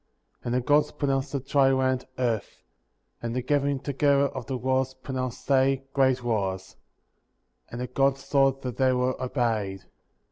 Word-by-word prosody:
And 120 0 -1
the 125 - +2
Gods 145 +3 +3
pronounced 135 -2 -1
the 140 - -1
dry 135 0 +3
land, 130 -1 0
earth; 115 -6 -2 0.6
and 115 0 -3
the 125 - -1
gathering 140 0 +1
together 140 0 +2
of 130 -3 -7
the 130 - -2
waters, 130 +1 0
pronounced 130 -2 -5
they, 135 0 +3
great 130 -2 +2
waters; 95 -5 -2 0.9
and 120 - -7
the 125 - -2
Gods 135 +2 0
saw 135 -1 +4
that 130 -3 -7
they 130 -1 +3
were 125 +1 +1
obeyed. 115 -7 -1
130 Hz, 155 wpm, -26 LUFS, 125-135 Hz, 0.9 s, saw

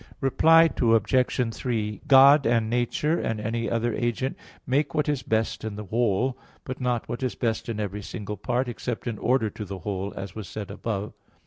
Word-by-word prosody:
Reply 165 +4 +5
Obj. 115 +1 +2
3: 110 -4 -3
God 140 0 +7
and 115 -1 +1
nature 125 +7 0
and 110 -1 -2
any 115 +2 -2
other 115 0 0
agent 120 +4 -1 0.3
make 145 +4 0
what 150 -1 +1
is 145 -3 0
best 110 -1 -1
in 110 -2 -4
the 105 0 -6
whole, 120 +4 0 0.2
but 130 0 -6
not 125 -2 -1
what 120 - -5
is 130 -2 -2
best 115 -1 -2
in 110 -2 -3
every 105 0 -3
single 105 +1 -6
part, 125 +2 -1
except 120 0 -4
in 115 -4 -3
order 120 -4 +1
to 105 - -7
the 100 -1 -6
whole, 95 +2 -4
as 95 -2 -6
was 110 -4 -7
said 105 -2 -6
above 105 0 -4
(Q. 105 -1 -38
115 Hz, 195 wpm, -26 LUFS, 105-130 Hz, 0.3 s, God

